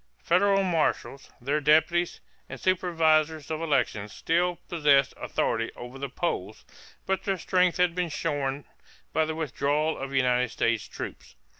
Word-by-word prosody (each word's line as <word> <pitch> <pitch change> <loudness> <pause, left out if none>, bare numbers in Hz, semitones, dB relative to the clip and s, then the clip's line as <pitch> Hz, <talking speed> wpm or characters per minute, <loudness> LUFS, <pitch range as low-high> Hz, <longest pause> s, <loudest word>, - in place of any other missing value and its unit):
Federal 195 +2 +3
marshals, 165 -5 -1
their 140 +5 -1
deputies, 160 +4 +2 0.3
and - - -7
supervisors 160 -4 +1
of 155 0 -2
elections 125 -9 0
still 175 +6 0
possessed 145 -5 +3
authority 115 0 -1
over 125 +2 -9
the 140 0 -4
polls, 110 - -3 0.4
but 190 0 0
their 195 -1 -1
strength 180 0 +2
had 180 -1 +2
been 180 -1 -1
shorn 145 -3 -2 0.5
by 160 +1 +2
the 160 0 -4
withdrawal 150 0 0
of 135 0 -6
United 125 -2 +2
States 115 -1 0
troops. - - -8
155 Hz, 140 wpm, -27 LUFS, 135-175 Hz, 0.5 s, Federal